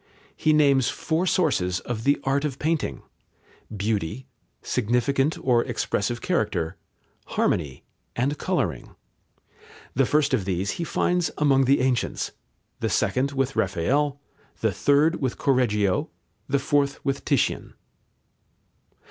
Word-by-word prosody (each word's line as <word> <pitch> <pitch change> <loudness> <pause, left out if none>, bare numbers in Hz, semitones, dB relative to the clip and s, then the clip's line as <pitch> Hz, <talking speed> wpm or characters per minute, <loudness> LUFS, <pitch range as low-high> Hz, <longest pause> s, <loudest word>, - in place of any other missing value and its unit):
He 155 - +2
names 140 -4 +4
four 165 +3 -1
sources 95 - +1
of 115 -2 -5
the 140 +1 +3
art 135 +1 +1
of 140 -4 -2
painting: 155 - -1 0.7
beauty, 105 +3 -2 0.4
significant 125 +5 +1
or 120 -2 +2
expressive 120 -1 -2
character, 80 +2 -1 0.5
harmony, 70 -6 -1 0.3
and 140 +5 -1
colouring. 95 - -2 1.0
The 135 0 +2
first 150 -1 +2
of 95 - +1
these 95 +1 -1
he - - 0
finds 175 +1 0
among 135 -3 +3
the 135 +1 +3
ancients, 130 -2 0 0.5
the - - -1
second 135 +2 +1
with 135 0 -1
Raphael, 135 - 0 0.4
the - - +2
third 150 +4 +2
with 130 -3 -1
Correggio, 105 -8 +1 0.4
the 140 - +3
fourth 140 0 0
with 135 0 -1
Titian. - - 0
135 Hz, 120 wpm, -25 LUFS, 110-145 Hz, 1.0 s, names